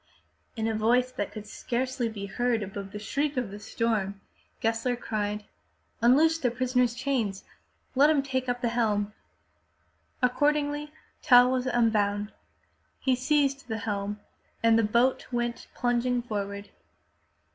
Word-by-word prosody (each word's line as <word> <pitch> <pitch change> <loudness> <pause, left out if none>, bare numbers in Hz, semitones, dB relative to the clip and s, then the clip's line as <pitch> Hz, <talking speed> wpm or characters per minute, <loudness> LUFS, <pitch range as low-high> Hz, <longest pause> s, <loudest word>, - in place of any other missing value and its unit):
In 220 - -1
a 225 - 0
voice 240 +4 +2
that 205 -6 -4
could 215 -1 -8
scarcely 245 +2 -2
be 205 -3 -6
heard 235 +2 0
above 195 0 -7
the 210 - -6
shriek 280 +7 -2
of 240 -6 -1
the 205 - -8
storm, 210 -3 -1 0.4
Gessler 230 +2 0
cried: 210 -3 -3 0.3
'' 75 - -42
Unloose 310 +7 +5
the 255 - +1
prisoner's 250 0 +1
chains. 235 -8 -1 0.5
Let 280 +3 +5
him 295 -3 +3
take 260 -1 -2
the 245 -1 0
helm!" 210 -3 0 1.1
Accordingly, 290 +3 +1 0.3
Tell 245 0 +7
was 255 0 0
unbound. 210 -4 +1 0.7
He 260 -1 +2
seized 275 +1 +1
the 220 -2 -2
helm 205 -1 -3 0.4
and 230 0 +5
the - - +3
boat 235 +5 +2
went 240 -1 -2
plunging 245 0 +1
forward. 200 -3 -4
240 Hz, 135 wpm, -28 LUFS, 210-255 Hz, 1.1 s, Tell